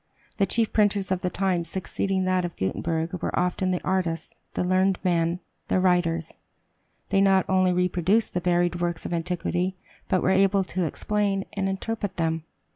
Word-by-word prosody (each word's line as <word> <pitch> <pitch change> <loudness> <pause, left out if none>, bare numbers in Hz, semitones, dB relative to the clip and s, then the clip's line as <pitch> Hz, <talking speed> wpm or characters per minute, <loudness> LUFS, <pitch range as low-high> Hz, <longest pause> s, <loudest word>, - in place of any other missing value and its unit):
The 195 - +2
chief 230 -2 +1
printers 205 -2 +2
of 185 - +1
the 180 - -1
times 180 -2 0
succeeding 190 +1 -1
that 185 0 +1
of 175 -1 -4
Gutenberg 165 - -2
were - - -1
often 180 +1 0
the 180 -1 -1
artists, 180 -3 -1 0.2
the - - 0
learned 185 +1 +2
men, 170 0 +1 0.3
the - - +2
writers. 175 -3 +1 0.8
They 195 -1 +3
not 195 -1 +4
only 185 -1 +3
reproduced 180 +4 +1
the 180 - -1
buried 175 0 +1
works 175 -1 -2
of - - -3
antiquity, 180 +2 -1 0.3
but 185 - +2
were 190 - +3
able 195 +1 +4
to 185 -1 -2
explain 200 +3 -1
and 195 -1 -1
interpret 205 +1 -3
them. 165 -1 -1
185 Hz, 170 wpm, -25 LUFS, 175-195 Hz, 0.8 s, not